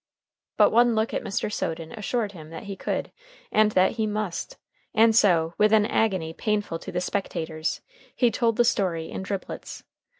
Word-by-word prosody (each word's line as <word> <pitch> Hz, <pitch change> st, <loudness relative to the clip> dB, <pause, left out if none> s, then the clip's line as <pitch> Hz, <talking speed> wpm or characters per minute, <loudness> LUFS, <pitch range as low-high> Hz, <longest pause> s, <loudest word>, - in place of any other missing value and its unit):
But -, -, +6 dB
one 240 Hz, 0 st, +4 dB
look 220 Hz, +1 st, 0 dB
at -, -, -1 dB
Mr. 205 Hz, +1 st, -3 dB
Soden 160 Hz, -3 st, -3 dB
assured 215 Hz, 0 st, -2 dB
him 155 Hz, -5 st, -11 dB
that 165 Hz, -, -8 dB
he 200 Hz, -1 st, -6 dB
could -, -, -3 dB, 0.4 s
and 215 Hz, 0 st, +4 dB
that 185 Hz, +1 st, +4 dB
he 220 Hz, -1 st, +1 dB
must, 210 Hz, -, -3 dB, 0.4 s
and 225 Hz, 0 st, +5 dB
so, 170 Hz, -6 st, +4 dB
with 210 Hz, 0 st, +5 dB
an 215 Hz, -1 st, +5 dB
agony 190 Hz, -8 st, 0 dB
painful 205 Hz, -4 st, -1 dB
to -, -, -8 dB
the -, -, -1 dB
spectators, 165 Hz, -4 st, -3 dB, 0.3 s
he 245 Hz, -3 st, +3 dB
told 230 Hz, +1 st, +1 dB
the 240 Hz, -, +4 dB
story 175 Hz, -8 st, 0 dB
in -, -, -4 dB
driblets. 190 Hz, 0 st, -6 dB
205 Hz, 175 wpm, -25 LUFS, 170-220 Hz, 0.4 s, But